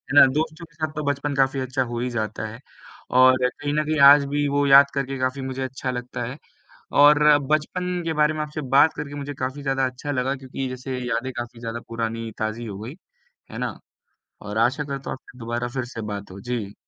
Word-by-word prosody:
ना, - - +10
दोस्तों 160 +3 -2
के 150 - -26
साथ 155 -1 -3
तो 155 - -3
बचपन 145 0 -3
काफ़ी 135 0 +2
अच्छा 130 +1 -1
हो 120 0 -3
ही 125 +1 -1
जाता 110 -2 -3
है 115 +2 -9 0.6
और 130 0 +6
कहीं 145 +3 -4
न 150 - +1
कहीं 155 -1 0
आज 145 0 +6
भी 145 0 0
वो 145 0 +1
याद 140 +1 +9
करके 135 -1 -2
काफ़ी 130 +1 -1
मुझे 130 0 -4
अच्छा 130 0 -3
लगता 125 0 -5
है 125 +5 -5 0.7
और 150 0 +7 0.3
बचपन 180 +3 -1
के 165 - -1
बारे 150 0 +2
में 155 - -4
आपसे 150 0 -4 0.2
बात 160 - +6
करके 145 -1 -6
मुझे 145 0 -5
काफ़ी 130 +3 -4
ज़्यादा 135 -1 0
अच्छा 130 +3 -5
लगा 130 +1 0
क्योंकि 130 0 -5
जैसे 130 0 -5
यादें 125 +1 -2
काफ़ी 120 -1 -6
ज़्यादा 115 0 -4
पुरानी 115 0 -3
ताजी 110 +2 -3
हो 100 -2 -6
गई, 115 +7 -7 0.6
है - - -7
ना। - - -3 0.7
और 105 +1 -4
आशा 125 +6 +2
करता 140 -1 -5
हूँ - - -4
आपसे 125 - -17
दोबारा 120 +1 -3
फिर 130 -2 -2
से 115 -2 -7
बात 100 -1 -7
हो 95 - -9
जी। 115 -5 -4
130 Hz, 215 wpm, -23 LUFS, 120-145 Hz, 0.7 s, ना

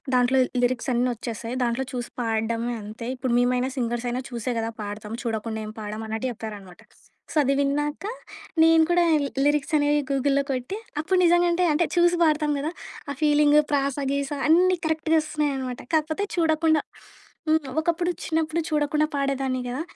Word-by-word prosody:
దాంట్లో 250 +1 +3 0.2
లిరిక్స్ 245 +1 0
అన్నీ 245 +1 +2
వచ్చేస్తాయి. 230 +1 -5
దాంట్లో 240 +3 -1
చూసి 245 -1 -4
పాడడమే 230 +1 -1
అంతే. 215 +3 -8
ఇప్పుడు 250 -1 -1
మేమైనా 250 +1 +1
సింగర్సయినా 240 +1 -1
చూసే 240 +1 -3
గదా 225 0 -2
పాడతాం. 210 +1 -6
చూడకుండా 220 -1 -2
ఏం 215 - -6
పాడమన్నట్టు 220 +3 -4
చెప్పారనమాట. 205 -5 -9 0.5
సో, - - -9
అది 275 0 +2
విన్నాక 295 +3 -1 0.6
నేను 325 0 +6
కూడా 350 0 +4 0.4
లిరిక్స్ 290 -1 +1
అనేవి 290 0 +2
గూగుల్‌లో 275 0 +2
కొట్టి 255 +7 -2 0.2
అప్పుడు 370 +5 +1
నిజంగంటే 345 0 +4
అంటే 320 +3 +2
చూసి 350 0 +4
పాడతాం 300 -2 +2
గదా! 300 +3 -2 0.4
ఆ - - -2
ఫీలింగు 300 0 +5
ప్రాసా 280 0 0
గీస 280 0 -1 0.2
అన్నీ 365 +3 +5
కరెక్ట్‌గా 320 0 +1
ఒస్తున్నాయనమాట. 275 -5 -2
కాకపోతే 315 +4 +1
చూడకుండా 315 -2 +2 0.7
హ్మ్. 315 -2 +2
ఒకప్పుడు 345 +2 0
చిన్నప్పుడు 320 0 0
చూడకుండా 300 0 +1
పాడేదాన్ని 270 -2 -1
గదా! 255 +5 -3
275 Hz, 145 wpm, -25 LUFS, 240-310 Hz, 0.7 s, నేను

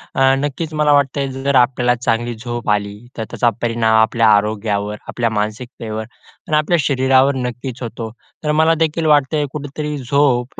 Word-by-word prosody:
अ, - - 0 0.2
नक्कीच 150 +3 -3
मला 150 -1 +2
वाटतं 140 0 +2
आहे 135 -1 -2
जर 135 +1 -1
आपल्याला 125 -1 +3
चांगली 120 -1 -1
झोप 120 0 -5
आली, 100 0 0 0.2
तर 110 - -2
त्याचा 120 - +2
परिणाम 115 -1 +1
आपल्या 115 0 +2
आरोग्यावर, 105 0 -1
आपल्या 120 -1 -1
मानसिकतेवर 110 +1 -4 0.4
आणि 155 - +2
आपल्या 160 +3 +2
शरीरावर 135 0 +3
नक्कीच 125 0 -5
होतो. 115 -1 -5 0.3
तर 150 - 0
मला 160 +2 +4
देखील 160 0 0
वाटतंय 150 0 +3
कुठेतरी 150 +1 -5
झोप 130 -1 0
125 Hz, 160 wpm, -18 LUFS, 115-145 Hz, 0.4 s, मला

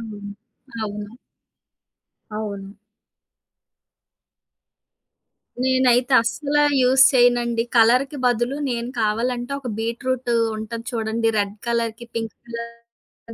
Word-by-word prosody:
అవును. 205 -3 -8 0.5
అవును. 210 0 -5 1.2
అవును. 200 -2 -6 2.9
నేనైతే 255 -1 +3
అస్సలా 295 +5 0 0.2
యూస్ 260 +1 +6
చెయనండి. 240 -2 +3
కలర్‌కి 250 +5 +4
బదులు 245 +2 +1
నేను 235 0 -3
కావాలంటే, 240 +4 -1
ఒక 260 - -7
బీట్‌రూటూ 240 +2 -2 0.2
ఉంటది 230 +1 -6
చూడండి 225 -1 -1
రెడ్ 200 0 -1
కలర్‌కి, 235 0 -1
పింక్ 225 -2 -3
కలర్‌కి 235 0 -11
235 Hz, 85 wpm, -22 LUFS, 225-250 Hz, 2.9 s, యూస్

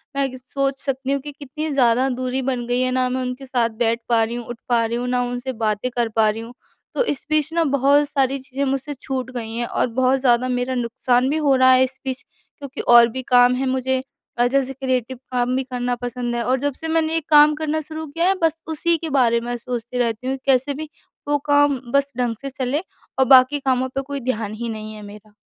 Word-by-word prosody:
मैं 275 -1 +1
कि 260 - -8
सोच 270 +1 -2
सकती 270 -1 -2
हूँ 280 - +1
कि 290 +2 -7
कितनी 300 +2 -6
ज़्यादा 250 -1 +3
दूरी 255 +1 -2
बन 255 -2 -2
गई 245 +1 +1
है। 255 - +1
ना 255 0 +1
मैं 255 +1 -2
उनके 250 +1 -5
साथ 245 -3 0
बैठ 230 -1 +1
पा 230 -1 +4
रही 225 +2 -3
हूँ, 240 -1 -5
उठ 240 0 -7
पा 235 -1 +3
रही 230 +1 -2
हूँ, 245 +1 -3
ना 250 0 +1
उनसे 245 +1 -4
बातें 220 +1 -1
कर 240 -1 +1
पा 220 -1 +4
रही 220 +1 -3
हूँ। 230 +2 -10 0.4
तो - - +2
इस 290 - -3
बीच 310 -1 +1
न 335 0 +2
बहुत 280 +2 +3
सारी 275 -2 +1
चीज़ें 265 +1 -4
मुझसे 275 +2 -2
छूट 260 -1 -3
गई 225 -3 -5
हैं 240 +1 -1
और - - 0
बहुत 255 +3 +1
ज़्यादा 250 -1 +3
मेरा 250 +1 -1
नुक़सान 245 +1 +1
भी 305 - 0
हो 285 -3 +3
रहा 260 0 +5
है 255 0 +6
इस 260 +1 -4
बीच 260 0 -3 0.4
क्योंकि 280 -2 -7
और 235 -1 +7
भी 260 +3 -5
काम 245 0 +5
है 265 +2 -1
मुझे। 260 0 0 0.4
अ, 240 - +3
जैसे 270 +1 0
क्रिएटिव 260 -1 -2
काम 250 0 0
भी 265 - 0
करना 250 -1 -2
पसंद 245 -1 -3
है 235 - -1
और 260 +1 +1
जब 285 +1 -1
से 325 - -3
मैंने 320 0 +1
ये 330 - +2
काम 300 0 +7
करना 315 0 -1
शुरू 315 +1 -6
किया 330 +4 -1
है 385 - +3
बस 325 0 +1
उसी 330 +2 +1
के 325 0 -5
बारे 245 -5 +3
में 240 +1 -3
सोचती 240 0 -5
रहती 240 0 -1
हूँ 270 +1 -1
कैसे 270 +1 +2
भी 305 +2 -7 0.4
वो 290 0 +2
काम 290 -2 +4
बस 280 0 +2
ढंग 245 -2 0
से 275 - -5
चलें 265 +3 -2 0.4
और 265 - +5
बाकी 260 +2 +6
कामों 260 -1 0
पर 270 - 0
कोई 280 +1 -5
ध्यान 215 -3 -5
ही 235 - -2
नहीं 215 -1 -6
है 215 - -10
मेरा। 210 +1 -13
255 Hz, 245 wpm, -21 LUFS, 245-275 Hz, 0.4 s, और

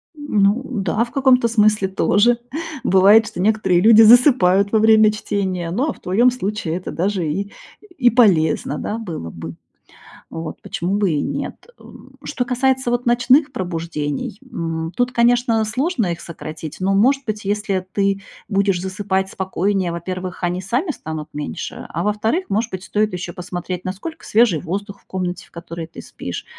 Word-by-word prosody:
Ну 220 -6 +1
да, 215 -1 -1
в 235 - -8
каком-то 260 -4 +3
смысле 215 -3 +3
тоже. 205 +5 +2 0.4
Бывает, 200 +4 +5
что - - -8
некоторые 190 -4 +2
люди 225 +1 +7
засыпают 215 -5 +6
во 220 - +3
время 220 -1 +5
чтения, 190 -5 -3
ну, 250 +10 0
а - - -2
в - - -20
твоем 235 +7 +3
случае 210 -7 -3
это 185 - -6
даже 185 -1 -1
и 200 +7 -3 0.5
и 245 -2 +5
полезно, 165 - +3
да, 215 - -3
было 165 - -6
бы. 80 0 -8 0.7
Вот. 165 -1 -7
Почему 185 +4 -3
бы 200 -5 +1
и 145 - 0
нет? - - -5
Э, - - -18 0.4
что 245 - -2
касается 260 0 0
вот 245 0 -1
ночных 255 +5 +3
пробуждений, 165 -2 -4
м, 165 -9 -4
тут, 245 0 +1
конечно, 235 -1 +2
сложно 245 - -1
их 170 - -7
сократить, 155 -2 -8
но, 195 +1 +1
может 270 +7 +3
быть, 215 -2 -4
если 200 -2 -1
ты 200 0 0 0.3
будешь 195 -3 +1
засыпать 190 0 -2
спокойнее, 190 -1 -1
во-первых, 185 +2 -5
они 175 +1 -1
сами 245 - -1
станут 155 - -6
меньше. 150 0 -6
А 170 - -3
во-вторых, 220 - 0
может 220 +3 -1
быть, 185 0 -5
стоит 215 +1 0
еще 180 -1 -5
посмотреть, 180 0 -6
насколько 205 - -6
свежий 215 -8 +3
воздух 200 +3 -5
в - - -34
комнате, 180 -2 -4
в - - -28
которой 170 -1 -7
ты - - -11
спишь, - - -7
200 Hz, 165 wpm, -20 LUFS, 180-230 Hz, 0.7 s, люди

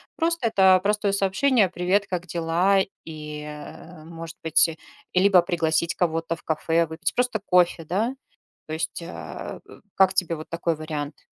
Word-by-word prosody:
просто 335 -5 0
это 190 -3 +5
простое 210 0 +1
сообщение: 200 +2 +2
"Привет, 185 +3 +1
как 180 -1 -4
дела?" 175 +4 +2 0.2
И, 150 -1 -7
э, 150 +2 -10
может 165 0 -9
быть, 160 +1 +5
э, 160 - -7 0.4
и 180 - +4
либо 190 -3 +6
пригласить 170 -2 0
кого-то 165 -1 -1
в - - -19
кафе 165 +1 +1
выпить 160 +1 -3
просто 250 -3 +1
кофе, 180 -3 +3
да? 210 - -1 0.5
То 155 - -7
есть, 160 +1 -3
а, - - -8
э, - - -14 0.2
как 190 0 +4
тебе 180 -3 +1
вот 155 - -9
такой 170 -1 -1
вариант? 150 -2 -5
170 Hz, 165 wpm, -24 LUFS, 160-195 Hz, 0.5 s, либо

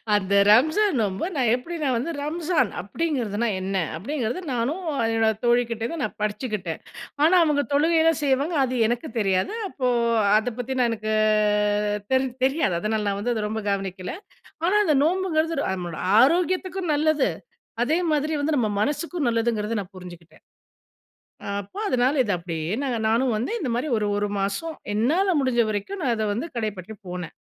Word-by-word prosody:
அந்த 200 -1 0 0.2
ரம்ஜான் 310 - +4
நோன்பு 200 - -1
நான் 255 -5 +2
எப்டி 255 +8 -3
நான் 265 -3 +1
வந்து, 260 +8 -2
ரம்ஜான் 310 - 0
அப்டிங்கிறதுனா 235 -4 -2
என்ன? 195 +1 -3 0.2
அப்படிங்கிறத 245 - -3
நானும், 270 +11 -1 0.3
என்னோட 225 0 +3
தோழிகிட்டேருந்து 240 +4 0
நான் 210 - -4
படிச்சுக்கிட்டேன். 210 - -3 0.4
ஆனா 335 +4 +5
அவுங்க 295 -3 +2
தொழுகைலாம் 320 +1 +3
செய்வாங்க 280 +4 +1
அது 255 -1 -1
எனக்கு 240 +1 -2
தெரியாது. 195 - +1
அப்போ 265 -8 -2 0.5
அத 220 +2 -1
பத்தி 255 +2 -3
நான் 245 -1 +3
எனக்கு 215 -1 -2 1.0
தெரி 260 0 +3 0.2
தெரியாது. 270 - +1
அதனால 215 0 -1
நான் 200 0 -1
வந்து 240 +4 0
அத 215 - -2
ரொம்ப 220 +1 -3
கவனிக்கல. 195 -2 -3 0.5
ஆனா 375 - +2
அந்த 305 - +3
நோம்புங்கிறது 340 -2 +1 0.2
நம்மளோட 175 -4 -3 0.2
ஆரோக்கியத்துக்கும் 360 +4 +1
நல்லது. 300 -1 +2 0.5
அதே 300 +7 +2
மாதிரி 305 +1 0
வந்து 300 +2 0
நம்ம 230 -4 +1
மனசுக்கும் 300 +5 -1
நல்லதுங்கிறத 230 -2 0
நான் 195 0 -10
புரிஞ்சுக்கிட்டேன். 175 -3 -12 1.2
அப்போ 200 - -11
அதனால 255 +2 +2
இத 205 - -1
அப்டியே 165 -1 -4
நாங்க 250 -4 -1
நானும் 235 +2 +2
வந்து 235 - -2
இந்த 280 - -2
மாரி 250 +6 -1
ஒரு 210 - -1
ஒரு 205 0 0
மாசம் 200 +12 -2 0.2
என்னால 330 - +2
முடிஞ்ச 255 -3 +1
வரைக்கும். 215 - -4
நான் 245 -4 +1
அத 220 - -1
வந்து 240 +10 -3
கடைப்பற்றி 215 -2 -4
போன. 180 -2 -5
245 Hz, 155 wpm, -24 LUFS, 210-305 Hz, 1.2 s, ஆனா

